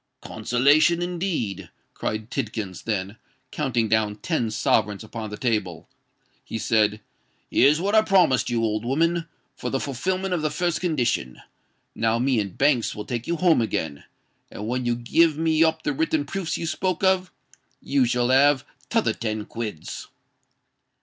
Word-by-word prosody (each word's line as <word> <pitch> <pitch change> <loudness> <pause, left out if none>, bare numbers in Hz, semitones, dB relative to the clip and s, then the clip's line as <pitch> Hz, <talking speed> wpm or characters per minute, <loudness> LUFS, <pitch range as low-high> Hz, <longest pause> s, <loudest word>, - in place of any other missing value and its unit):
"Consolation, 145 +7 +3
indeed!" 175 - -3 0.2
cried 110 +2 -4
Tidkins: 105 -8 -4
then, 100 -1 -2 0.3
counting 125 -6 0
down 110 -1 +1
ten 120 -1 -1
sovereigns 105 -2 +1
upon 110 0 -6
the 105 - -7
table, 105 -9 -2 0.6
he - - -5
said, 105 -1 +1 0.5
"Here's 145 +4 +5
what 200 +4 -1
I 220 - +7
promised 180 -13 +3
you, 115 -1 0
old 110 -1 0
woman, 165 +6 +1 0.3
for - - -4
the 135 - -1
fulfilment 185 +9 -2
of 175 - 0
the 155 - 0
first 170 +3 -1
condition. 120 - -1 0.5
Now 115 0 +1
me 125 0 +2
and 100 -3 -4
Banks 135 -5 +2
will 105 - -6
take 120 0 -4
you 170 - 0
home 170 -5 +3
again; 80 -10 -3 0.5
and 105 - -7
when 125 +1 -1
you 120 - +2
give 150 +6 +2
me 160 0 +3
up 160 -1 +1
the 145 - 0
written 155 0 0
proofs 175 +1 -3
you - - -4
spoke 185 +3 -2
of, 190 -1 +2 0.5
you 140 -2 +1
shall 120 0 +1
have 135 +1 +4 0.2
t'other - - +2
ten 110 -2 -3
quids." 110 -8 -6
125 Hz, 155 wpm, -24 LUFS, 110-160 Hz, 0.6 s, I